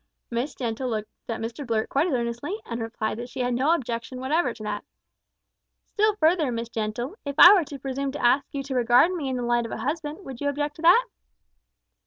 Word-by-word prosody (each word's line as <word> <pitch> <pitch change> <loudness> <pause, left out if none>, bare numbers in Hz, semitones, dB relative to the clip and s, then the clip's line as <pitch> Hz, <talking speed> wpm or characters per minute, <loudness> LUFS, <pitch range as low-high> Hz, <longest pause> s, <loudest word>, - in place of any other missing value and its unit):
Miss 240 +5 -2
Gentle 245 +1 -3
looked 215 -2 -3 0.2
at 230 - -2
Mr 230 +5 -5
Blurt 225 -4 -1
quite 285 +6 +1
as 335 - -1
earnestly, 240 - -3
and 230 0 -5
replied 225 -1 -3
that 245 +1 -6
she 255 +1 -5
had 245 0 0
no 265 +6 +2
objection 240 -3 -5
whatever 300 +7 +1
to 215 - -10
that. 210 -1 -3 1.0
"Still 430 0 +1
further, 320 -6 +2
Miss 230 0 -4
Gentle: 230 - -3
if 280 -1 -4
I 355 - +11
were 370 -6 +3
to 285 - -8
presume 270 +1 -3
to 290 - -2
ask 265 +3 +4
you 275 -1 -4
to 270 0 -5
regard 245 +6 +4
me 315 -7 -3
in 260 - -2
the 245 - -3
light 240 -1 +1
of - - -11
a - - -4
husband, 300 - -4
would 265 -1 -8
you 285 - +1
object 290 +1 -3
to - - -10
that?" 360 +9 +6
260 Hz, 225 wpm, -25 LUFS, 235-295 Hz, 1.0 s, I